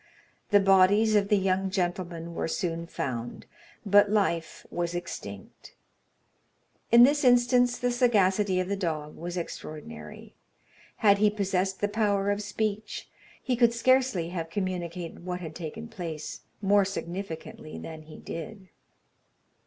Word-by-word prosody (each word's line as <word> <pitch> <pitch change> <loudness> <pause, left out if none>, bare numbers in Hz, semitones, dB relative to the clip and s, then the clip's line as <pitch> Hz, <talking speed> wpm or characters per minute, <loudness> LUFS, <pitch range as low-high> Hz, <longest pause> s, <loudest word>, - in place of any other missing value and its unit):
The 205 - +6
bodies 195 +3 +5
of 200 -1 +3
the 210 - +3
young 190 0 +1
gentlemen 175 -2 -3
were - - -2
soon 165 0 -2
found, 120 -6 -5 0.4
but 205 0 +5
life 190 -6 0
was 175 0 -2
extinct. 100 - -8 1.2
In 235 +1 +9
this 290 +3 +4
instance 245 0 +4
the 245 0 0
sagacity 205 -5 +2
of 185 - -1
the 200 - -1
dog 155 -6 -3
was 175 +2 -5
extraordinary. 80 - -8 0.6
Had 200 -2 +4
he 210 0 +5
possessed 195 -2 -1
the 205 - +2
power 205 -2 +1
of 205 +1 -1
speech, 210 +1 -3 0.3
he 255 - 0
could 235 -1 +4
scarcely 250 -8 +2
have 165 -2 -4
communicated 175 -2 -4
what 180 0 -4
had 160 -3 -7
taken 175 +8 -7
place 165 -9 -6 0.2
more 200 +1 +5
significantly 175 -4 -6
than 160 -1 -8
he 155 0 -12
did. 190 +3 -8
190 Hz, 135 wpm, -28 LUFS, 170-210 Hz, 1.2 s, In